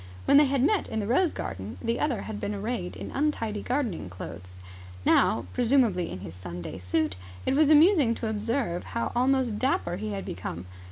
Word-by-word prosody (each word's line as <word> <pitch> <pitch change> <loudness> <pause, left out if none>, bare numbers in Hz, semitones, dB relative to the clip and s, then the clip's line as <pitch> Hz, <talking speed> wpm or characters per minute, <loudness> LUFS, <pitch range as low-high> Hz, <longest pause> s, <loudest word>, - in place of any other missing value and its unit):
When 280 - +6
they 295 - +7
had 270 -1 +1
met 410 +3 +2
in 220 - -2
the 205 - -2
rose 295 - +2
garden, 95 +3 -6
the 230 +1 -1
other 275 -7 0
had 215 -1 -6
been 205 - -3
arrayed 205 -3 -3
in - - -7
untidy 230 -8 -1
gardening 245 - -2
clothes. 90 0 -9 0.5
Now, - - +3
presumably 235 -8 +2
in 95 - -7
his 90 -4 -8
Sunday 90 0 -7
suit, 95 +1 -1 0.3
it - - +2
was 300 0 +4
amusing 305 - +6
to 225 - -4
observe 220 -3 -1
how 235 - -1
almost 255 -3 +2
dapper 180 -9 0
he 215 +2 -4
had 195 - -4
become. 85 0 -5
220 Hz, 185 wpm, -27 LUFS, -, 0.5 s, they